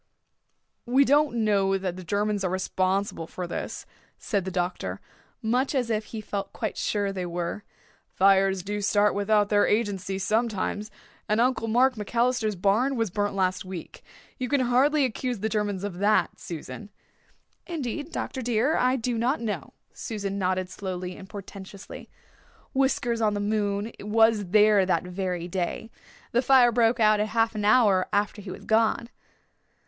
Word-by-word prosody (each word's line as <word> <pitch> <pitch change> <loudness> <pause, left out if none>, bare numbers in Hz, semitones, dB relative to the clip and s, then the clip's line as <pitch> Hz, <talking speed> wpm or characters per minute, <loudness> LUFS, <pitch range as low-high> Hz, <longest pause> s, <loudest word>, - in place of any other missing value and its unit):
"We 265 +3 +4
don't 290 -2 +3
know 195 -2 +2
that 185 -2 -3
the 185 - -8
Germans 205 +3 -1
are 185 - 0
responsible 185 -1 -1
for 180 - -5
this," 170 - -5 0.3
said 200 -5 -2
the - - -2
doctor 180 -1 -3 0.4
much 250 +6 +1
as 245 -3 0
if 215 -1 -1
he 220 - -7
felt 200 -1 -5
quite 220 -3 -3
sure 205 -2 -1
they 185 -2 -3
were. 175 +3 -4 0.5
"Fires 195 -1 +3
do 205 +2 -3
start 205 +1 +3
without 205 0 +2
their 205 -1 +3
agency 200 -3 -1
sometimes. 215 0 -1 0.4
And 215 +1 +2
Uncle 245 -1 +1
Mark 250 +2 +3
MacAllister's 230 0 0
barn 210 +9 +2
was 225 -5 -1
burnt 205 +1 -1
last 185 -1 0
week. 185 -3 -8 0.4
You 250 -1 -2
can 285 -2 +2
hardly 265 +4 +3
accuse 250 -1 -3
the 220 - 0
Germans 205 -3 -1
of 190 -3 -5
that, 210 +2 +2
Susan." 175 +5 -8 0.8
"Indeed, 300 -1 -4
Dr. 260 - -4
dear, 245 +5 +1
I 255 +1 +2
do 240 -2 -2
not 255 +6 +1
know." 205 - -4 0.2
Susan 200 -3 -4
nodded 185 -1 -1
slowly 185 -2 -5
and 190 - -12
portentously. 200 0 -10 0.6
"Whiskers 250 -3 +1
on 210 -1 +2
the - - -1
moon 205 +1 -1
was 220 0 +3
there 210 +1 +5
that 185 - +1
very 180 -1 -3
day. 185 +5 -3 0.4
The 240 - +3
fire 255 -2 +5
broke 235 +1 +2
out 215 -1 +4
half 225 +2 +1
an 210 -1 -3
hour 205 -4 +4
after 205 +1 0
he 195 - -9
was - - -9
gone. 225 +1 +2
210 Hz, 160 wpm, -26 LUFS, 195-235 Hz, 0.8 s, there